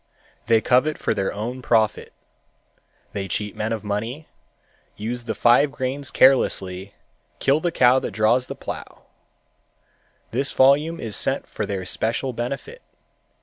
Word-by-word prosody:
They 115 -1 +4
covet 130 +6 +2
for - - -1
their 95 -1 -1
own 120 +5 -5
profit. 110 -3 +1 1.0
They 100 -1 -3
cheat 105 +2 -3
men 110 +1 -2
of 110 -2 -3
money, 115 +9 -4 0.7
use 120 +3 -4
the - - -3
five 125 +4 +4
grains 135 0 -3
carelessly, 95 -7 +2 0.4
kill 140 +3 +2
the 175 +1 -1
cow 130 -4 +4
that - - -4
draws 110 +5 +2
the - - -6
plow. - - -8 1.3
This 135 +4 -2
volume 145 +5 +4
is 110 -3 -4
sent - - -1
for - - -5
their 95 -2 -3
special 115 +7 -1
benefit. 140 - -5
120 Hz, 140 wpm, -23 LUFS, 105-135 Hz, 1.3 s, They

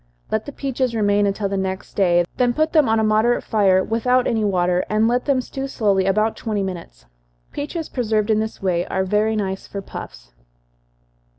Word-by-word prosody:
Let 220 +3 -1
the - - -5
peaches 260 -3 -2
remain 205 -1 +2
until 200 +1 -1
the 195 0 -2
next 190 0 -4
day 175 -3 +3
then 245 -1 +2
put 310 +1 +1
them 305 -7 +4
on 225 0 +3
a - - +1
moderate 215 +3 +2
fire, 190 -3 +3
without 250 +4 +1
any 220 -2 0
water, 180 -2 +1
and 215 +1 +2
let 245 +1 0
them 275 -3 +2
stew 270 +2 -5
slowly 200 -7 +1
about 215 +3 +1
twenty 210 -3 -2
minutes. 170 - -7 0.5
Peaches 310 +3 -4
preserved 220 -3 0
in 215 - +3
this 220 -2 -4
way, 175 -2 +1
are 190 - -1
very 210 +3 +1
nice 195 -2 -3
for 200 - -6
puffs. - - -10
215 Hz, 190 wpm, -21 LUFS, 190-240 Hz, 0.5 s, them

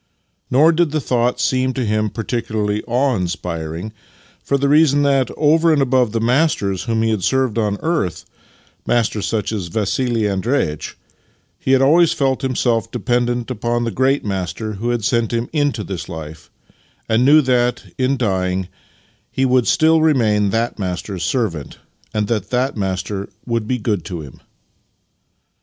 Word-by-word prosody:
Nor 150 +6 +5
did 170 -1 +2
the 155 +1 -1
thought 125 -2 0
seem 130 +2 +1
to 130 -2 -2
him 110 0 0
particularly 110 -2 -2
awe 125 +2 +1
inspiring, 85 0 -4 0.5
for 140 - +1
the 140 +1 0
reason 145 -1 +4
that, 135 -3 +2
over 160 +2 +4
and 155 - +3
above 130 -4 +2
the 115 - -1
masters 115 - +1
whom 115 -1 0
he 115 - +1
had 105 -4 -1
served 130 0 +1
on 105 -2 0
earth 160 - -1 0.3
— - - -34
masters 110 -3 0
such 110 -2 -1
as 100 -6 -3
Vassili 110 +4 0
Andreitch 100 - -1 0.3
— - - -41
he 130 - +1
had 135 0 +4
always 165 +4 +5
felt 135 -2 0
himself 120 -3 0
dependent 120 0 -1
upon 120 0 -1
the 115 - -2
Great 130 +5 +1
Master 100 +2 -3
who 110 +4 -3
had 120 -2 -1
sent 115 -1 +1
him 115 0 -1
into 145 -7 0
this 95 -3 -6
life, 80 -2 -8 0.6
and 115 +2 +2
knew 150 +4 +6
that, 125 -1 +1 0.2
in 130 +1 +1
dying, 95 -5 -1 0.6
he 135 - 0
would 125 -2 +2
still 160 0 +4
remain 110 -10 +2
that 115 +2 -1
Master's 95 0 -4
servant, 95 - -2 0.3
and 105 -1 0
that 110 -2 -2
that 130 +2 0
Master 95 0 -3 0.2
would 115 -3 -2
be 130 - 0
good 105 -6 -1
to 90 -5 -5
him. 70 -4 -12
120 Hz, 165 wpm, -19 LUFS, 105-130 Hz, 0.6 s, knew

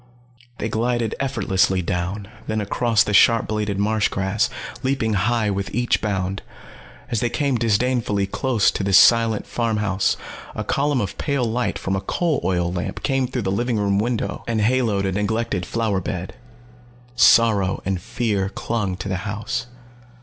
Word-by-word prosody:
They 110 - -2
glided 115 0 -1
effortlessly 95 -8 +1
down, 90 +4 -3 0.2
then 110 0 -1
across 110 +2 +2
the 105 - -3
sharp 115 +2 +5
bladed 105 -2 -2
marsh 105 +1 +1
grass, 95 +3 0 0.3
leaping 130 -4 0
high 110 +2 +1
with 100 0 -3
each 120 0 +1
bound. 95 -2 -2 0.7
As 115 - +1
they 120 - 0
came 140 +2 0
disdainfully 115 -2 +1
close 115 +2 +1
to - - -3
the 100 0 0
silent 115 +1 +5
farm 115 -2 -1
house, 100 -2 0 0.4
a - - -3
column 140 -2 0
of 100 - -5
pale 140 -4 0
light 115 -1 -1
from 95 - -2
a 95 - -2
coal 160 - -1
oil 90 -2 0
lamp 90 -1 -4
came 135 -2 +1
through 125 -2 -3
the 95 - -1
living 120 +3 0
room 100 -1 +1
window 115 +1 -2
and 115 -2 0
haloed 110 -4 +1
a 95 - 0
neglected 105 -2 -1
flower 110 -5 -1
bed. 90 +1 -5 0.8
Sorrow 115 -5 +4
and 95 -2 -1
fear 110 -3 -1
clung 100 -4 -3
to 95 - -6
the 95 -1 -1
house. 120 +3 -3
110 Hz, 165 wpm, -22 LUFS, 95-120 Hz, 0.8 s, sharp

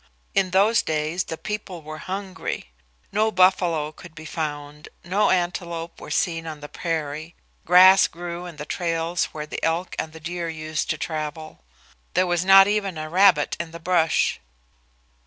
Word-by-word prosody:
In 190 -1 +2
those 200 +5 +4
days 155 +3 -1
the 160 - -5
people 200 -5 -6
were 155 +1 -8
hungry. 190 - -5 0.4
No 215 +2 +2
buffalo 180 -5 +3
could 165 +1 -14
be 160 +1 -10
found, 150 -2 -5
no 200 +4 +2
antelope 175 -2 -2
were - - -9
seen 165 -2 -1
on 155 -2 -6
the 145 - -8
prairie. 155 0 -4 0.3
Grass 185 +2 +8
grew 175 +1 -7
in 170 - -9
the 150 0 -7
trails 165 +1 -1
where 150 -1 -7
the 150 - -7
elk 165 +3 -1
and 160 - -3
the 160 - -11
deer 170 +1 -4
used 155 -1 -3
to 155 - 0
travel. 155 0 -5 0.6
There 185 +1 +4
was 175 -1 0
not 195 +1 +8
even 200 -4 -1
a 155 0 -6
rabbit 180 -5 +4
in 170 -1 -4
the 165 +1 -10
brush. 170 -1 +1
170 Hz, 165 wpm, -23 LUFS, 155-185 Hz, 0.6 s, Grass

